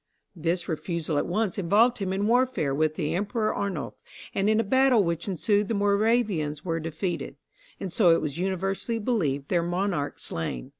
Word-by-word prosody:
This 170 Hz, +1 st, -1 dB
refusal 160 Hz, -2 st, -2 dB
at -, -, -2 dB
once 205 Hz, +1 st, -1 dB
involved 220 Hz, +7 st, +3 dB
him 190 Hz, -2 st, -2 dB
in 195 Hz, +2 st, 0 dB
warfare 240 Hz, -, +2 dB
with 155 Hz, +2 st, +1 dB
the 155 Hz, -2 st, -1 dB
Emperor 210 Hz, +4 st, 0 dB
Arnulph, 190 Hz, -8 st, -4 dB, 0.3 s
and 195 Hz, +2 st, +1 dB
in 220 Hz, 0 st, +3 dB
a -, -, +3 dB
battle 260 Hz, 0 st, +4 dB
which 170 Hz, 0 st, -2 dB
ensued 205 Hz, +2 st, +1 dB
the 225 Hz, -, -1 dB
Moravians 200 Hz, -7 st, +1 dB
were 165 Hz, -2 st, -1 dB
defeated, 165 Hz, +2 st, -4 dB, 0.4 s
and, 185 Hz, -3 st, -5 dB
so 180 Hz, -3 st, +4 dB
it 165 Hz, -, +5 dB
was 155 Hz, +1 st, -4 dB
universally 195 Hz, +4 st, -1 dB
believed, 160 Hz, -, -1 dB
their 175 Hz, -2 st, +2 dB
monarch 175 Hz, -3 st, -1 dB
slain. 70 Hz, -7 st, -5 dB
185 Hz, 170 wpm, -26 LUFS, 165-210 Hz, 0.4 s, it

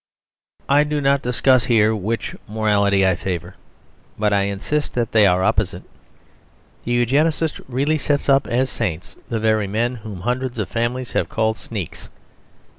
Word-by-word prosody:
I 145 Hz, +1 st, +4 dB
do 150 Hz, 0 st, -1 dB
not 140 Hz, -1 st, +2 dB
discuss 125 Hz, 0 st, +2 dB
here 110 Hz, -3 st, +3 dB
which 110 Hz, +3 st, -3 dB
morality 100 Hz, -2 st, +2 dB
I 95 Hz, -1 st, +3 dB
favour; 90 Hz, -3 st, -4 dB, 0.6 s
but 105 Hz, -1 st, +1 dB
I 100 Hz, -1 st, +2 dB
insist 100 Hz, +10 st, -2 dB
that 120 Hz, -2 st, -1 dB
they 110 Hz, -2 st, +5 dB
are 90 Hz, 0 st, +2 dB
opposite. 105 Hz, -1 st, 0 dB, 1.0 s
The 120 Hz, -, -2 dB
Eugenist 150 Hz, +6 st, +1 dB
really 140 Hz, +5 st, 0 dB
sets 145 Hz, 0 st, 0 dB
up 135 Hz, -1 st, +3 dB
as 130 Hz, +2 st, 0 dB
saints 90 Hz, -7 st, -4 dB
the 115 Hz, -, -1 dB
very 110 Hz, -2 st, +1 dB
men 120 Hz, +5 st, -1 dB
whom 105 Hz, -4 st, -8 dB
hundreds 125 Hz, +3 st, -2 dB
of 110 Hz, -, -3 dB
families 120 Hz, +2 st, -2 dB
have -, -, -1 dB
called 110 Hz, -1 st, 0 dB
sneaks. 100 Hz, -8 st, -7 dB
115 Hz, 155 wpm, -21 LUFS, 105-130 Hz, 1.0 s, they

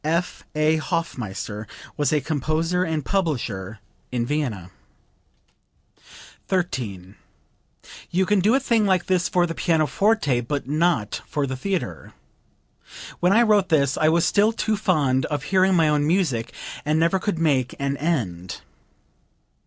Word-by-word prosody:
F.A. 160 Hz, -1 st, 0 dB
Hofmeister 110 Hz, -, -4 dB, 0.3 s
was 145 Hz, -3 st, 0 dB
a 155 Hz, -, +3 dB
composer 160 Hz, +5 st, 0 dB
and 160 Hz, -4 st, -2 dB
publisher 115 Hz, -, -2 dB, 0.3 s
in 120 Hz, -2 st, -1 dB
Vienna.) 120 Hz, -, -3 dB, 1.8 s
13. 110 Hz, -, -3 dB, 0.9 s
"You 185 Hz, +2 st, +1 dB
can 205 Hz, +1 st, +2 dB
do 210 Hz, +7 st, +3 dB
a -, -, +4 dB
thing 230 Hz, -5 st, +2 dB
like 185 Hz, -2 st, +2 dB
this 180 Hz, -1 st, +1 dB
for 180 Hz, -1 st, +2 dB
the 165 Hz, -, -4 dB
pianoforte, 165 Hz, -, +1 dB
but 135 Hz, +2 st, -4 dB
not 150 Hz, -7 st, 0 dB
for 145 Hz, -2 st, -1 dB
the 130 Hz, -1 st, -4 dB
theatre. 150 Hz, -, -4 dB, 1.1 s
When 180 Hz, +1 st, +3 dB
I 230 Hz, +4 st, +5 dB
wrote 210 Hz, -4 st, +3 dB
this 140 Hz, -4 st, +2 dB
I 155 Hz, -, +3 dB
was 165 Hz, +1 st, +3 dB
still 210 Hz, +2 st, +3 dB
too 220 Hz, -1 st, -1 dB
fond 145 Hz, -11 st, +1 dB
of 145 Hz, -1 st, -3 dB
hearing 190 Hz, +1 st, +3 dB
my 165 Hz, -2 st, +4 dB
own 150 Hz, -1 st, +2 dB
music, 155 Hz, -10 st, 0 dB, 0.3 s
and 150 Hz, +1 st, +1 dB
never 170 Hz, +4 st, +2 dB
could 200 Hz, -2 st, -2 dB
make 140 Hz, -6 st, +1 dB
an 140 Hz, 0 st, -1 dB
end." 105 Hz, -, -2 dB
155 Hz, 135 wpm, -23 LUFS, 130-185 Hz, 1.8 s, I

